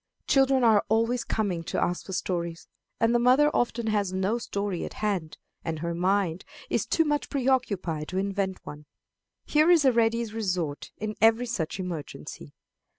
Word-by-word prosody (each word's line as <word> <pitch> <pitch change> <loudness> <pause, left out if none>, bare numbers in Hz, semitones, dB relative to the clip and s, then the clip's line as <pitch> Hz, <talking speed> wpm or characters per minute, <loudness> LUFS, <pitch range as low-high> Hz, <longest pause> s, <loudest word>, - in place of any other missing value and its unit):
Children 270 -1 +3
are 220 -3 +5
always 230 +3 +1
coming 190 -6 -1
to - - -2
ask 180 - -1
for 190 - -6
stories, 170 -2 -3 0.3
and 230 +1 +3
the 240 - +4
mother 260 +5 +5
often 235 -1 0
has 205 -3 0
no 190 +5 0
story 200 -5 -3
at - - -6
hand, 185 -8 -2 0.3
and 165 -1 -3
her 170 +2 -3
mind 185 0 0 0.3
is - - 0
too 325 - +2
much 295 -1 -1
preoccupied 225 - 0
to 185 - -4
invent 195 -1 -2
one. 150 0 -9 0.6
Here 305 +2 +3
is 335 -5 +5
a 260 - +6
ready 230 0 +2
resort 185 -9 -3
in 215 0 -3
every 225 +2 +5
such 195 -7 -3
emergency. 160 - -7
205 Hz, 165 wpm, -27 LUFS, 180-240 Hz, 0.6 s, a